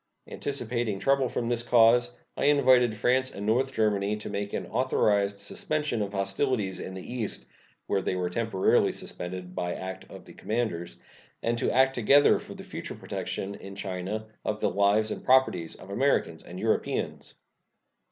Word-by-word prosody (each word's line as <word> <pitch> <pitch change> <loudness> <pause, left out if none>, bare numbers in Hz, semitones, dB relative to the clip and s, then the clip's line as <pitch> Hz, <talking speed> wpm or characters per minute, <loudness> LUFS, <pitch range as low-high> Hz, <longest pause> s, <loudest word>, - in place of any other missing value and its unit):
Anticipating 120 -6 -2
trouble 135 +4 +2
from 120 -1 -2
this 120 -1 +1
cause, 120 +1 +4 0.2
I - - -1
invited 130 -5 +5
France 130 +4 +2
and 100 -4 -7
North 125 +5 +2
Germany 105 -3 +1
to 105 - -7
make 100 0 -3
an - - -3
authorized 105 -5 +1
suspension 145 +4 -2
of 100 -1 -2
hostilities 100 +1 -1
in 95 - -6
the 95 - -7
East 115 -4 -3 0.4
(where 95 - 0
they 95 - -1
were 90 -1 -2
temporarily 110 -2 +2
suspended 90 0 -7
by 90 -1 -2
act 95 -1 -7
of - - -11
the - - -13
commanders), 105 - -3 0.5
and 115 +1 +1
to - - +1
act 130 +1 +4
together 135 +4 +5
for - - -10
the - - -9
future - - -7
protection 100 +1 -4
in 100 -1 -9
China 100 +2 -4 0.2
of 105 0 -2
the - - +1
lives 100 +3 +3
and - - -5
properties 125 -11 +3
of 95 - -12
Americans 100 - +1
and 90 - -9
Europeans. 110 +1 -1
110 Hz, 165 wpm, -28 LUFS, 100-125 Hz, 0.5 s, invited